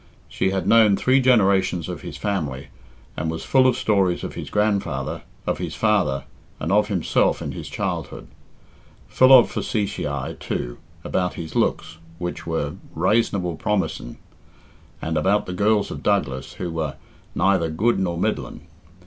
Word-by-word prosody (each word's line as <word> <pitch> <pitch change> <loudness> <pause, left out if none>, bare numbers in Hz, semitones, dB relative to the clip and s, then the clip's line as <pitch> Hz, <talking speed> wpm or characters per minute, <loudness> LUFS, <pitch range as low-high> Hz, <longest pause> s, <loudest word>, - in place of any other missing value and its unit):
She 95 - 0
had 95 -2 -2
known 110 -4 +6
three 130 +6 +3
generations 100 -8 +3
of - - -6
his - - -7
family, 75 -10 -3 0.5
and 80 - -2
was 80 0 -4
full 130 -1 +4
of 125 -1 +2
stories 95 -4 +1
of - - -5
his - - -7
grandfather, 100 -10 -1 0.2
of - - -1
his - - -4
father, 100 -11 +1 0.4
and 80 - -2
of 105 +1 +4
himself 95 -6 +1
in - - -4
his - - -7
childhood. - - -4 0.8
Full 130 +1 +5
of 130 -3 +8
facetiæ, 75 - -3
too, - - -4 0.2
about 90 -1 -1
his 80 -2 -7
looks, 80 - 0 0.2
which 90 -1 -5
were 75 -3 -2 0.2
"rasonable 90 -2 +1
promising," 95 - -2 0.9
and 80 0 -1
about 95 +7 +2
the 90 - -5
girls 105 +2 +2
of - - -6
Douglas, 75 -10 -1
who 90 -2 -5
were 80 -4 -3 0.4
"neither 95 -4 +2
good 105 +10 +1
nor 85 -3 -1
middling." - - -3
95 Hz, 150 wpm, -23 LUFS, 80-105 Hz, 0.9 s, of